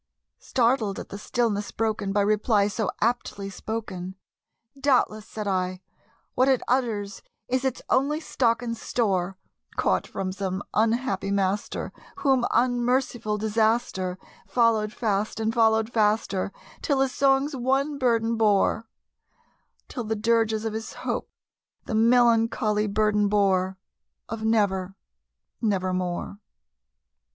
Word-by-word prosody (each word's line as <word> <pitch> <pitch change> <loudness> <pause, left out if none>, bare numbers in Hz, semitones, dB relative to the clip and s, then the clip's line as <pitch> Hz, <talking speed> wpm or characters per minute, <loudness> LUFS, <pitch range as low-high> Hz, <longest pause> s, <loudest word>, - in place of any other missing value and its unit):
Startled 230 -5 +1
at - - -7
the 200 - -7
stillness 215 -3 -1
broken 215 -3 -1
by 205 +1 +2
reply 210 0 +2
so 210 +1 -2
aptly 210 -4 -1
spoken, 190 -4 -5 0.6
"Doubtless," 250 -6 +2
said 215 -2 -5
I, 185 -1 -1 0.5
"what 255 - +3
it 265 -2 +3
utters 220 -6 -1 0.3
is 255 +1 0
its 265 -2 -2
only 280 +4 +2
stock 235 -7 0
and 230 -1 -2
store, 195 -6 -1 0.4
Caught - - +1
from 185 -1 -3
some 190 0 -3
unhappy 220 -3 +1
master 200 0 -1 0.2
whom 265 -3 +2
unmerciful 245 -2 +1
Disaster 215 -3 0 0.3
Followed 225 -3 +2
fast 215 -1 -1
and 220 0 0
followed 220 0 +3
faster 210 -3 +1 0.3
till 275 -3 +1
his 270 -1 +2
songs 275 +2 +2
one 270 +3 0
burden 230 -3 +2
bore 220 +1 +2 1.0
Till 245 - -5
the 220 0 -2
dirges 225 0 +1
of 220 - -2
his 220 +1 -5
Hope - - -2 0.6
the - - -4
melancholy 225 -2 +3
burden 210 0 +2
bore 190 -2 +2 0.5
Of 225 0 -5
'Never 195 -4 +1 0.7
nevermore.'" 185 -3 -1
220 Hz, 120 wpm, -25 LUFS, 200-240 Hz, 1.0 s, what